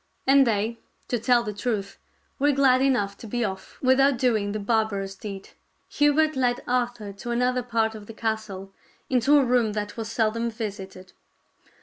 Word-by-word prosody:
And 270 Hz, -1 st, +5 dB
they, 225 Hz, +1 st, -1 dB, 0.3 s
to 245 Hz, -, 0 dB
tell 240 Hz, +1 st, +3 dB
the 210 Hz, -2 st, -4 dB
truth, 205 Hz, -2 st, -3 dB, 0.4 s
were 290 Hz, +1 st, +3 dB
glad 265 Hz, -2 st, +4 dB
enough 240 Hz, -8 st, +1 dB
to 225 Hz, -, -9 dB
be 240 Hz, +2 st, -1 dB
off 190 Hz, -1 st, -7 dB
without 265 Hz, +1 st, +4 dB
doing 220 Hz, -5 st, +1 dB
the 215 Hz, -, -3 dB
barbarous 205 Hz, -2 st, -1 dB
deed. 195 Hz, 0 st, -8 dB, 0.4 s
Hubert 295 Hz, +1 st, +2 dB
led 245 Hz, -2 st, 0 dB
Arthur 240 Hz, -4 st, -1 dB
to 200 Hz, +4 st, -8 dB
another 250 Hz, +1 st, +1 dB
part 230 Hz, -2 st, 0 dB
of 210 Hz, -2 st, -10 dB
the 225 Hz, -, -9 dB
castle, 215 Hz, -4 st, -4 dB, 0.4 s
into 265 Hz, +4 st, +4 dB
a 280 Hz, -, +4 dB
room 240 Hz, -3 st, +2 dB
that 210 Hz, +1 st, -4 dB
was 225 Hz, -1 st, -5 dB
seldom 230 Hz, +1 st, 0 dB
visited. 195 Hz, -4 st, -7 dB
230 Hz, 165 wpm, -25 LUFS, 205-250 Hz, 0.4 s, And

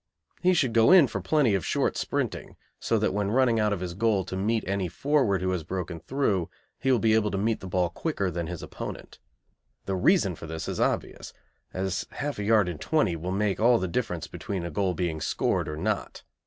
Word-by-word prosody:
He 185 Hz, 0 st, +4 dB
should 130 Hz, -8 st, +1 dB
go 115 Hz, +4 st, +5 dB
in 185 Hz, -5 st, +8 dB
for 100 Hz, -6 st, -4 dB
plenty 125 Hz, -, +2 dB
of 95 Hz, -4 st, 0 dB
short -, -, 0 dB
sprinting, -, -, -3 dB, 0.2 s
so -, -, +1 dB
that -, -, 0 dB
when 100 Hz, 0 st, 0 dB
running 120 Hz, 0 st, +3 dB
out 105 Hz, -1 st, +2 dB
of 100 Hz, -3 st, -2 dB
his 90 Hz, -2 st, -4 dB
goal 100 Hz, -1 st, +1 dB
to 95 Hz, -, -5 dB
meet 110 Hz, +4 st, 0 dB
any 95 Hz, -1 st, -1 dB
forward 110 Hz, -, +1 dB
who 95 Hz, -, +1 dB
has 90 Hz, -3 st, -2 dB
broken 90 Hz, 0 st, -4 dB
through 105 Hz, -, -1 dB, 0.3 s
he 135 Hz, -, +1 dB
will 130 Hz, -, +4 dB
be 110 Hz, -1 st, +2 dB
able 110 Hz, -1 st, +3 dB
to 100 Hz, -, -2 dB
meet 110 Hz, +3 st, 0 dB
the 95 Hz, -, -8 dB
ball 90 Hz, -1 st, +1 dB
quicker 100 Hz, -, -2 dB
than 85 Hz, -1 st, -3 dB
his 85 Hz, -2 st, -6 dB
opponent. -, -, -8 dB, 0.7 s
The 95 Hz, -, -1 dB
reason 100 Hz, -, +3 dB
for 80 Hz, -, -9 dB
this 80 Hz, 0 st, -5 dB
is -, -, -3 dB
obvious, -, -, -2 dB, 0.4 s
as 95 Hz, 0 st, -2 dB
half 145 Hz, -5 st, -4 dB
a -, -, -2 dB
yard 105 Hz, -2 st, +4 dB
in 85 Hz, -4 st, -4 dB
twenty 130 Hz, -, +1 dB
will 85 Hz, +3 st, -4 dB
make 100 Hz, 0 st, 0 dB
all 120 Hz, +2 st, +5 dB
the 95 Hz, -, -2 dB
difference 90 Hz, -5 st, -2 dB
between 95 Hz, -4 st, -5 dB
a 85 Hz, -, -4 dB
goal 95 Hz, +2 st, 0 dB
being 85 Hz, -4 st, -2 dB
scored -, -, 0 dB
or 75 Hz, -, -5 dB
not. -, -, -3 dB
100 Hz, 220 wpm, -27 LUFS, 90-115 Hz, 0.7 s, in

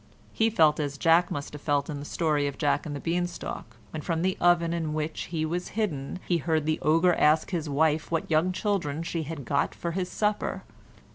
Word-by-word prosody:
He 225 Hz, 0 st, +3 dB
felt 160 Hz, -9 st, +4 dB
as 145 Hz, -1 st, -2 dB
Jack 165 Hz, +3 st, +4 dB
must 145 Hz, 0 st, -5 dB
have 150 Hz, -, -8 dB
felt 145 Hz, -1 st, +1 dB
in 145 Hz, -3 st, -5 dB
the 145 Hz, -, -7 dB
story 150 Hz, -3 st, 0 dB
of 140 Hz, -, -5 dB
Jack 150 Hz, +1 st, +1 dB
and 145 Hz, -, -4 dB
the -, -, -4 dB
Bean 175 Hz, +3 st, 0 dB
Stalk, 120 Hz, -8 st, -7 dB
when 155 Hz, -, -5 dB
from 165 Hz, +1 st, -1 dB
the 185 Hz, 0 st, +1 dB
oven 170 Hz, -1 st, +4 dB
in 160 Hz, -2 st, -2 dB
which 155 Hz, 0 st, -3 dB
he 160 Hz, -2 st, -2 dB
was 175 Hz, +3 st, -2 dB
hidden 155 Hz, -10 st, -2 dB
he 175 Hz, -, +2 dB
heard 160 Hz, -1 st, 0 dB
the 155 Hz, 0 st, 0 dB
ogre 165 Hz, +3 st, +4 dB
ask 155 Hz, +2 st, +3 dB
his 165 Hz, -4 st, -2 dB
wife 150 Hz, +2 st, +1 dB
what 165 Hz, -1 st, -1 dB
young 160 Hz, +4 st, +3 dB
children 180 Hz, -6 st, -1 dB
she 170 Hz, 0 st, -3 dB
had 155 Hz, -3 st, -6 dB
got 140 Hz, +4 st, 0 dB
for 170 Hz, -, -3 dB
his 180 Hz, +1 st, -2 dB
supper. 210 Hz, +1 st, -1 dB
160 Hz, 220 wpm, -27 LUFS, 150-175 Hz, -, felt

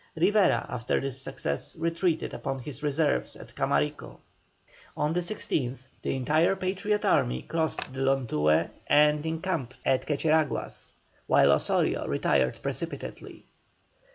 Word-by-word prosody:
Rivera 195 Hz, +4 st, +3 dB
after 120 Hz, 0 st, -1 dB
this 135 Hz, -1 st, -4 dB
success 70 Hz, -, -3 dB
retreated 165 Hz, 0 st, -1 dB
upon 135 Hz, 0 st, -3 dB
his 135 Hz, +2 st, -8 dB
reserves 150 Hz, 0 st, 0 dB
at -, -, -13 dB
Camarico. 70 Hz, +1 st, -1 dB, 0.8 s
On 150 Hz, +2 st, 0 dB
the 175 Hz, -, +1 dB
16th, 155 Hz, -, -2 dB, 0.2 s
the -, -, -1 dB
entire 155 Hz, +8 st, +2 dB
Patriot 195 Hz, +3 st, -1 dB
army 60 Hz, +1 st, +2 dB
crossed 160 Hz, -5 st, -2 dB
the 130 Hz, -, -6 dB
Lontué 95 Hz, -, +2 dB, 0.2 s
and 150 Hz, 0 st, +4 dB
encamped 160 Hz, -6 st, -2 dB
at 130 Hz, -1 st, +1 dB
Quecheraguas, 155 Hz, -, 0 dB, 0.3 s
while -, -, +5 dB
Osorio -, -, +1 dB
retired 65 Hz, -3 st, +1 dB
precipitately. -, -, -5 dB
150 Hz, 120 wpm, -28 LUFS, 130-165 Hz, 0.8 s, while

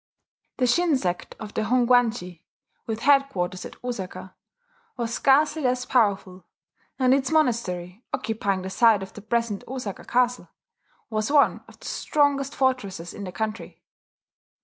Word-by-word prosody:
The 255 Hz, -, +2 dB
Shin 320 Hz, +4 st, +3 dB
sect 180 Hz, -6 st, -3 dB
of 215 Hz, -1 st, -8 dB
the -, -, -1 dB
Hongwanji, 235 Hz, -6 st, +2 dB, 0.5 s
with 225 Hz, 0 st, -3 dB
headquarters 270 Hz, -11 st, +2 dB
at -, -, -14 dB
Osaka, 190 Hz, -6 st, -6 dB, 0.6 s
was 235 Hz, -1 st, -2 dB
scarcely 295 Hz, +5 st, +3 dB
less 250 Hz, -2 st, 0 dB
powerful; 200 Hz, -6 st, +1 dB, 0.5 s
and 260 Hz, -1 st, +4 dB
its 270 Hz, -1 st, +1 dB
monastery, 225 Hz, -, 0 dB
occupying 200 Hz, -4 st, -1 dB
the 190 Hz, -, -5 dB
site 220 Hz, -2 st, +4 dB
of 190 Hz, -, -10 dB
the 210 Hz, -, -10 dB
present 225 Hz, -1 st, -1 dB
Osaka 250 Hz, -6 st, -5 dB
castle, 245 Hz, 0 st, 0 dB, 0.6 s
was 215 Hz, +3 st, -1 dB
one 290 Hz, -1 st, +4 dB
of -, -, -17 dB
the -, -, -14 dB
strongest 285 Hz, -2 st, +1 dB
fortresses 200 Hz, -10 st, -1 dB
in 200 Hz, -, -7 dB
the 185 Hz, -, -6 dB
country. 220 Hz, +3 st, -5 dB
230 Hz, 140 wpm, -25 LUFS, 195-260 Hz, 0.6 s, and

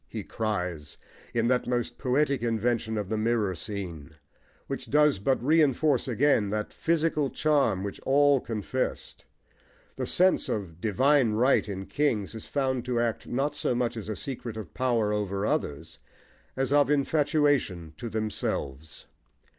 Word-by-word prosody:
he -, -, -6 dB
cries, 90 Hz, -9 st, -3 dB, 0.3 s
in 115 Hz, 0 st, +1 dB
that 125 Hz, 0 st, +1 dB
most 120 Hz, -1 st, -2 dB
poetic 140 Hz, +1 st, +1 dB
invention 115 Hz, -1 st, 0 dB
of 105 Hz, -2 st, -2 dB
the 110 Hz, +2 st, -2 dB
mirror 110 Hz, -3 st, +1 dB
scene, 85 Hz, -4 st, -6 dB, 0.5 s
which -, -, -6 dB
does 150 Hz, -6 st, +4 dB
but 130 Hz, +7 st, +1 dB
reinforce 150 Hz, 0 st, +3 dB
again 125 Hz, -4 st, +2 dB
that 105 Hz, +1 st, -3 dB
physical 160 Hz, -3 st, +1 dB
charm 140 Hz, -13 st, +1 dB
which 100 Hz, -, -5 dB
all 140 Hz, 0 st, +4 dB
confessed. 115 Hz, +3 st, -4 dB, 0.7 s
The -, -, -2 dB
sense 185 Hz, +1 st, +3 dB
of 90 Hz, -5 st, -4 dB
"divine 125 Hz, +3 st, +3 dB
right" 120 Hz, 0 st, +3 dB
in 95 Hz, -1 st, -5 dB
kings 115 Hz, -9 st, 0 dB
is 110 Hz, -, -8 dB
found 130 Hz, -3 st, -1 dB
to 125 Hz, -1 st, 0 dB
act 115 Hz, -1 st, -1 dB
not 140 Hz, +4 st, -1 dB
so 125 Hz, -, -1 dB
much 120 Hz, -1 st, 0 dB
as 110 Hz, -2 st, -6 dB
a 110 Hz, -, -2 dB
secret 120 Hz, 0 st, -5 dB
of 110 Hz, -, -8 dB
power 115 Hz, -5 st, +1 dB
over 100 Hz, -1 st, -1 dB
others, 80 Hz, -, -3 dB, 0.6 s
as 135 Hz, +1 st, 0 dB
of 145 Hz, -2 st, +4 dB
infatuation 145 Hz, -, +1 dB
to 120 Hz, -, -5 dB
themselves. 80 Hz, -9 st, -3 dB
120 Hz, 145 wpm, -27 LUFS, 105-140 Hz, 0.7 s, does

